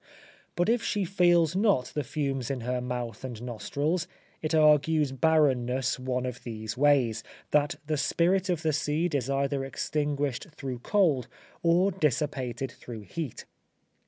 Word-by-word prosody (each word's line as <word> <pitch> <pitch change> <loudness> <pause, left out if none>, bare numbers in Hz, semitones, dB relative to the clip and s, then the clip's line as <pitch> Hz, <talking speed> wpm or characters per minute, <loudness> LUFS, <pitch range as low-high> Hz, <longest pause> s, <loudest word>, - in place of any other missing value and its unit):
But 175 - +1
if 235 +1 +2
she 205 -3 -1
feels 175 -3 +3
not 195 - +2
the 150 - -1
fumes 135 -2 -2
in 135 -3 -2
her 125 +1 -2
mouth 125 -2 -4
and 125 -4 -6
nostrils, 145 +8 -2 0.3
it 160 +1 0
argues 150 -1 +4
barrenness 135 -4 +2
one 125 0 -2
of 125 -1 -5
these 110 -2 -5
ways 130 -5 +3 0.3
that 150 +2 +2
the 155 0 -1
spirit 180 +6 +1
of 175 -2 0
the 155 -1 +1
seed 155 +3 0
is 135 -2 -1
either 140 0 0
extinguished 145 0 -2
through 130 -5 -5
cold, 150 - +2 0.3
or 175 +4 +3
dissipated 135 -6 -1
through 115 -3 -9
heat. 130 - -6
145 Hz, 145 wpm, -28 LUFS, 125-160 Hz, 0.3 s, argues